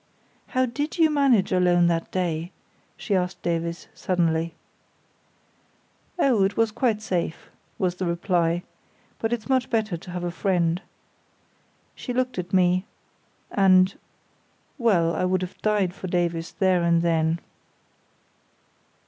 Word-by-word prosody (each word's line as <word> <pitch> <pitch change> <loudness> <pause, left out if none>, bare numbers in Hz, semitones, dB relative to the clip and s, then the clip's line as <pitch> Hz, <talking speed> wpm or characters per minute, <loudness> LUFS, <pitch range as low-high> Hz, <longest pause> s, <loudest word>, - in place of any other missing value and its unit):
"How 255 -1 +1
did 290 +7 -3
you 320 -2 +4
manage 270 -9 +3
alone 180 -1 +4
that 165 -1 0
day?" 175 -2 -2 0.5
she 210 - -3
asked 180 0 -1
Davies, 170 0 -2
suddenly. 165 -2 0 1.6
"Oh, 255 - +3
it 195 +1 0
was 225 -1 +2
quite 220 -2 0
safe," 175 -5 -3 0.3
was 180 -2 0
the 180 0 -3
reply. 170 0 0 0.6
"But 225 - -1
it's 235 -3 -2
much 260 -2 +1
better 220 -6 0
to 175 - -13
have 180 0 -4
a 175 - -2
friend." 175 -2 0 1.1
She 250 - -6
looked 255 -5 -1
at 180 0 -5
me; 185 0 +3 0.7
and—well, 190 - +1
I - - -1
would 185 0 +1
have 180 - -8
died 205 -4 +1
for 190 - -7
Davies 175 -2 -1
there 185 -3 +3
and 170 0 +2
then. 165 -1 +2
185 Hz, 130 wpm, -25 LUFS, 170-215 Hz, 1.6 s, you